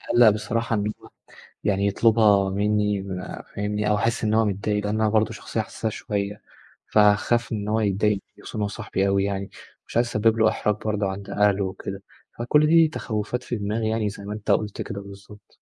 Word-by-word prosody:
مقّلق 120 -2 +7
بصراحة 115 +2 -1
إن 105 +1 -1
هو - - -13 0.6
يعني 100 0 +1
يطلبها 105 -2 +4
منّي 105 0 +1
ما 95 -1 -6
فاهمني؟ 105 +1 -1
أو 105 - +3
احس 115 +3 0
إن 110 0 +1
هو 110 0 +4
متضايق؛ 100 0 -3
لأن 105 -1 0 0.2
أنا 110 - +3
برضه 110 +1 +2
شخصية 110 +1 -3
حسّاسه 110 +1 -4
شوية، 105 0 -4 0.5
فهاخاف 105 +3 +3
إن 105 -2 -3
هو 110 +1 +1
يتضايق 105 0 +2
مني 100 - -10
خصوصًا - - -7
إن 105 - -1
هو 105 - +1
صاحبي 100 -2 -2
أوي 100 0 +2
يعني، 100 -1 -2 0.4
مش - - -3
عايز 120 - +3
أسبّب 115 0 +2
له 110 0 +5
احراج 105 - 0
برضه 105 -2 0
عند 95 +1 -6
أهله 100 -1 +2
وكده، 95 +1 -6 0.4
فكل 150 +6 +3
دي 165 0 +6
تخوّفات 120 -4 -3
في 120 - -3
دماغي 110 +2 -1
يعني 110 -2 0
زي 100 0 -9
ما 105 - -4
أنت 105 -1 -2
قُلت 105 -1 0
كده 100 0 -5
بالضبط. 100 +1 -14
105 Hz, 200 wpm, -24 LUFS, 100-110 Hz, 0.6 s, مقّلق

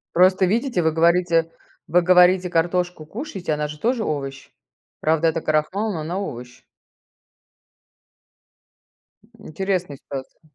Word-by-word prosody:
Просто 185 +1 +5
видите, 230 0 0
вы 160 -1 +2
говорите 165 0 +2 0.4
вы 175 +2 +4
говорите, 180 +1 +5
картошку 175 -1 -1
кушаете, 195 - -5
она 150 0 -2
же 150 0 -9
тоже 235 -1 0
овощ. 135 -2 -4 0.5
Правда, 160 +1 +2
это 165 - -2
крахмал, 185 +8 0
но 160 - -4
она 175 +5 -3
овощ. 125 -9 -7 2.8
М, - - -12
интересная 180 -4 -2
ситуация. 135 +2 -9
170 Hz, 120 wpm, -22 LUFS, 155-185 Hz, 2.8 s, Просто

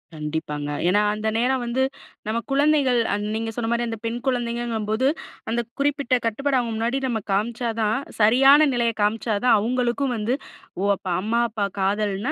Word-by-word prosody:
கண்டிப்பாங்க. 150 -1 -4 0.2
ஏன்னா, 205 +3 +3
அந்த 215 +1 -3
நேரம் 250 +1 +1
வந்து 255 +3 0 0.4
நம்ம 225 +2 0
குழந்தைகள், 280 -3 +3
அந் 205 0 -2
நீங்க 225 0 -2
சொன்னமாரி 235 0 0
அந்த 225 - -4
பெண் 230 +1 -2
குழந்தைங்கங்கும்போது, 235 -1 -1 0.4
அந்த 235 +1 0 0.2
குறிப்பிட்ட 280 -3 +1
கட்டுப்பாடு 265 +4 +1
அவுங்க 235 - -2
முன்னாடி 240 +4 0
நம்ம 235 -3 -1
காமிச்சா 230 +4 0
தான் 215 0 +1 0.2
சரியான 270 +7 +6
நிலைய 235 -1 +1
காமிச்சா 215 +2 +1
தான் 245 - +6
அவுங்களுக்கும் 250 +3 0
வந்து, 220 +4 -1 0.5
"ஓ! - - -1
அப்போ 190 -1 -7
அம்மா, 225 +3 0
அப்பா 210 -2 -1
காதல்னா 205 +5 0
235 Hz, 155 wpm, -23 LUFS, 215-255 Hz, 0.5 s, சரியான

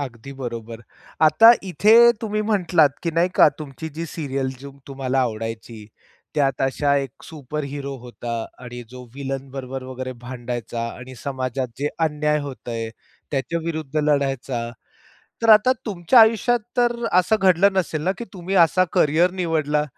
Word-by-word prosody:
अगदी 135 -1 -7
बरोबर. 115 -4 -7 0.4
आता 225 +9 +8
इथे 200 +4 +3 0.3
तुम्ही 215 -1 -2
म्हंटलात, 180 -8 +3
की 170 - -1
नाही 170 +2 +3
का - - +8
तुमची 150 0 -7
जी 165 - -3
सीरियल 140 -4 -3
जो 140 0 -11
तुम्हाला 135 -1 -1
आवडायची. 115 -1 -5 0.5
त्यात 135 -4 +1
अशा 140 +2 +1
1 135 -1 -4
सुपर 150 -1 -6
हीरो 140 -1 -5
होता 120 -1 -7 0.3
आणि 120 0 -8
जो 125 0 -10
विलनबरोबर 135 -1 -5
वगैरे 130 0 -6
भांडायचा 120 -2 -5
आणि 130 +1 -10
समाजात 130 -1 -3
जे 145 - 0 0.2
अन्याय 150 0 0
होतंय 120 -5 -5 0.4
त्याच्या 145 +4 -2
विरुद्ध 155 -3 -4
लढायचा. 135 -5 -1 0.7
तर 230 - +1
आता 215 +4 +7
तुमच्या 200 +4 +4
आयुष्यात 225 +2 +4 0.2
तर 240 -1 +3 0.2
असं 185 +4 +4
घडलं 190 +1 +4
नसेल 165 -5 -1
ना, 185 - +2
की 235 - -5
तुम्ही 185 0 -5
असा 185 +3 +2
करियर 160 +5 +3
निवडला 155 -3 0
140 Hz, 145 wpm, -22 LUFS, 130-170 Hz, 0.7 s, आता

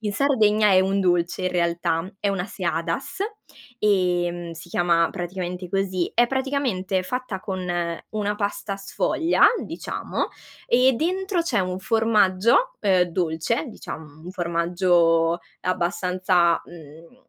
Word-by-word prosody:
in 210 -2 -2
Sardegna 215 -6 +3
è 185 0 +6
un 195 +1 +1
dolce 175 -1 +1
in 185 - 0
realtà, 170 0 0
è 205 - 0
una 195 -2 -1
seadas, 170 - -3 0.6
ehm, 175 -4 +1
si 165 +1 -11
chiama 170 -1 +2
praticamente 180 0 -5
così, 185 -2 -1
è 240 - +5
praticamente 260 -9 -1
fatta 250 0 -4
con 190 -3 -4 0.5
una 210 -1 -1
pasta 205 -1 -3
sfoglia, 320 - 0 0.2
diciamo, - - -4 0.4
e 255 +1 +4
dentro 370 - 0
c'è 245 - 0
un 185 0 -2
formaggio, 225 - +3
uhm, 190 -3 +3
dolce 175 - -1
diciam 155 -7 -9
un 180 - -7
formaggio 170 -1 +2 0.2
abbastanza, 180 -1 +1
mhmm, 165 - -14
185 Hz, 120 wpm, -23 LUFS, 175-215 Hz, 0.6 s, è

